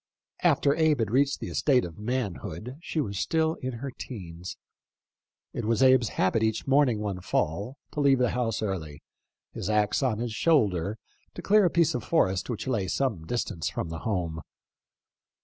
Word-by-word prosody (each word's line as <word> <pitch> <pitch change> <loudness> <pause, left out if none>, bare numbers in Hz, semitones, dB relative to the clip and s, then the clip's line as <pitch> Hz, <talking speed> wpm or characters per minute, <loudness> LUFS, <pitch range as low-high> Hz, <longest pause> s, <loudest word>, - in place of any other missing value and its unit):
After 140 - +3
Abe 160 -2 +3
had 110 -3 -1
reached 140 +3 +2
the - - -5
estate 130 -7 +2
of 85 0 -9
manhood, 105 -2 -4
she 165 - -3
was 100 -9 -2
still 160 -1 +1
in 130 -1 -3
her 130 +4 -5
'teens. 90 -9 -8 1.0
It 120 - -3
was 115 +3 +2
Abe's 130 -4 +5
habit 95 +4 +2
each 110 0 0
morning 135 -4 +3
one 100 -3 -3
fall, 100 - -1
to - - -5
leave 140 -2 +5
the 125 -2 +2
house 115 -3 -1
early, 80 -8 -4 0.5
his - - -4
axe 105 +2 +2
on 125 -6 +1
his 115 0 -3
shoulder, 110 - +2 0.4
to - - -7
clear 210 0 +5
a - - +4
piece 170 -1 +2
of 125 - -3
forest 95 - +1
which 110 -4 -3
lay 110 -8 -1
some 100 -8 -1
distance 100 -8 -2
from 80 - -4
home. 85 -2 -2
115 Hz, 170 wpm, -27 LUFS, 95-135 Hz, 1.0 s, Abe's